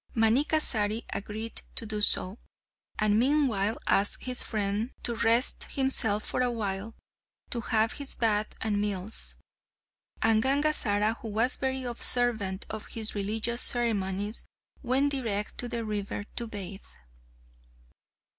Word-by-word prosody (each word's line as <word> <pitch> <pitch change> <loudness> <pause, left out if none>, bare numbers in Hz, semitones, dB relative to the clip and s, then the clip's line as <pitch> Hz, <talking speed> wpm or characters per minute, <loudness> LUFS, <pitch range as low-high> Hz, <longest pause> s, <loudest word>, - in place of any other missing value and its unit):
Manikkasari 225 -2 +2
agreed 220 +3 -5
to 230 - 0
do 210 -1 -2
so, 200 0 +4 0.6
and 215 0 +2
meanwhile 240 -6 +1
asked 200 +1 +4
his 250 -1 -1
friend 210 +1 -2
to 240 - +1
rest 230 +2 +2
himself 235 -6 +4
for - - -1
a 250 - +1
while 210 -1 -4 0.6
to 235 - -1
have 225 -1 0
his 280 -1 -2
bath 215 -2 +1
and 210 -2 -1
meals; 205 0 -2 0.8
and 225 -1 +3
Gangazara, 235 -6 +1
who 230 - -8
was 225 +4 +1
very 265 -1 -3
observant 235 -5 +2
of 215 0 -6
his 220 -1 -2
religious 220 +4 -1
ceremonies, 210 -4 0 0.4
went 270 +3 +1
direct 220 -7 -3
to 245 - -1
the 230 -1 -3
river 205 -1 -4
to 235 - -2
bathe. 200 -2 -7
225 Hz, 125 wpm, -28 LUFS, 205-245 Hz, 0.8 s, so